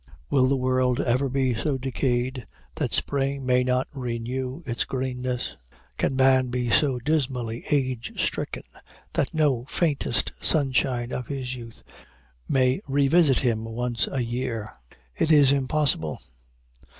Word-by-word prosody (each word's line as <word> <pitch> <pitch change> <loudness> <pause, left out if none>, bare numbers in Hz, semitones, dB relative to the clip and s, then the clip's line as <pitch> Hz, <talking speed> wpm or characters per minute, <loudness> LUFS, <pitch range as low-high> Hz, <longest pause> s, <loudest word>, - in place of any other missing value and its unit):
Will 130 -2 +4
the 140 - +2
world 130 -1 +1
ever 130 +3 +1
be 130 -1 +1
so 135 +5 -1
decayed 130 -1 -1 0.3
that - - -2
spring 140 -1 -1
may 125 0 +3
not 125 +1 +1
renew 125 +3 -4
its 120 -3 -1
greenness? 125 -1 -3 0.4
Can 135 - +1
man 130 -1 +4
be 125 -1 -1
so 135 -2 +3
dismally 125 -4 -1
age 130 -5 -1
stricken - - -1 0.5
that - - 0
no 140 -6 +1
faintest 145 -7 0
sunshine 130 -4 +1
of 125 - -4
his 130 -2 -4
youth 115 -3 -10 0.7
may 130 +4 +2
revisit 140 +1 +4
him 115 -3 0
once 120 +1 -2
a 135 - -1
year? 115 -2 -3 0.4
It 160 - +1
is 145 -3 +6
impossible. 135 - +1
130 Hz, 130 wpm, -25 LUFS, 125-135 Hz, 0.7 s, is